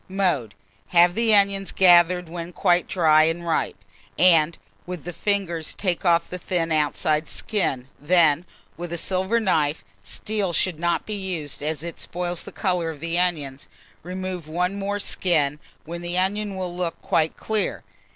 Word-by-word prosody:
Mode. 175 Hz, -, 0 dB, 0.3 s
Have 175 Hz, 0 st, +5 dB
the 225 Hz, +1 st, +3 dB
onions 200 Hz, -1 st, +2 dB
gathered 180 Hz, -1 st, +5 dB
when 170 Hz, +1 st, -7 dB
quite 175 Hz, -1 st, +2 dB
dry 155 Hz, -3 st, +4 dB
and 165 Hz, +2 st, -2 dB
ripe, 165 Hz, -, -1 dB, 0.4 s
and, 165 Hz, -2 st, +4 dB, 0.3 s
with 180 Hz, -3 st, -6 dB
the 175 Hz, -, -6 dB
fingers, 175 Hz, -4 st, -2 dB
take 180 Hz, -4 st, -1 dB
off 170 Hz, -2 st, +3 dB
the 180 Hz, -, -6 dB
thin 170 Hz, -2 st, -1 dB
outside 155 Hz, 0 st, +1 dB
skin; 135 Hz, -, -2 dB
then, 165 Hz, +1 st, +3 dB, 0.3 s
with 175 Hz, 0 st, -6 dB
a 170 Hz, -, -2 dB
silver 190 Hz, +6 st, 0 dB
knife 155 Hz, -, 0 dB, 0.2 s
(steel 195 Hz, -, -2 dB
should 170 Hz, -2 st, 0 dB
not 175 Hz, 0 st, 0 dB
be 215 Hz, -, -4 dB
used, 180 Hz, -9 st, -4 dB
as 155 Hz, 0 st, -2 dB
it 170 Hz, -1 st, -6 dB
spoils 175 Hz, -1 st, -3 dB
the -, -, -9 dB
colour 180 Hz, -4 st, -1 dB
of 155 Hz, -3 st, -7 dB
the 165 Hz, +2 st, -1 dB
onions), 145 Hz, -7 st, -2 dB, 0.3 s
remove 185 Hz, -2 st, -5 dB
one 180 Hz, +4 st, -1 dB
more 200 Hz, +1 st, -2 dB
skin, 155 Hz, -7 st, +1 dB, 0.3 s
when 170 Hz, +2 st, -6 dB
the 175 Hz, +1 st, -2 dB
onion 200 Hz, +2 st, 0 dB
will 180 Hz, -2 st, -4 dB
look 175 Hz, -2 st, -3 dB
quite 160 Hz, -1 st, +1 dB
clear. 215 Hz, -1 st, -2 dB
175 Hz, 160 wpm, -24 LUFS, 160-185 Hz, 0.4 s, Have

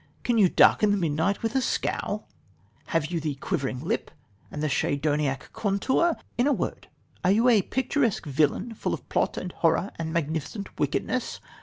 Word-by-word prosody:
Can 240 Hz, -2 st, +2 dB
you 190 Hz, -4 st, +6 dB
darken 210 Hz, -, +5 dB
the 205 Hz, -, +3 dB
midnight 170 Hz, +4 st, 0 dB
with 225 Hz, 0 st, 0 dB
a 265 Hz, -, +2 dB
scowl? -, -, -2 dB, 0.6 s
Have 165 Hz, -1 st, 0 dB
you 170 Hz, -, 0 dB
the 150 Hz, -2 st, -2 dB
quivering 135 Hz, -1 st, -2 dB
lip 165 Hz, -, -2 dB, 0.4 s
and 150 Hz, -, -5 dB
the -, -, +2 dB
Schedoniac 145 Hz, -1 st, 0 dB
contour? 260 Hz, -, +1 dB, 0.2 s
In 245 Hz, -, +4 dB
a 290 Hz, -, +4 dB
word, -, -, -3 dB, 0.4 s
are 180 Hz, -, +3 dB
you 220 Hz, +5 st, +4 dB
a 220 Hz, -4 st, +5 dB
picturesque 255 Hz, -, 0 dB
villain 150 Hz, -, +1 dB
full -, -, -2 dB
of -, -, -15 dB
plot -, -, 0 dB
and 180 Hz, -, -4 dB
horror 165 Hz, +4 st, +1 dB
and 160 Hz, -1 st, -3 dB
magnificent 160 Hz, +5 st, -3 dB
wickedness? 165 Hz, -, -1 dB
175 Hz, 170 wpm, -26 LUFS, 150-225 Hz, 0.6 s, you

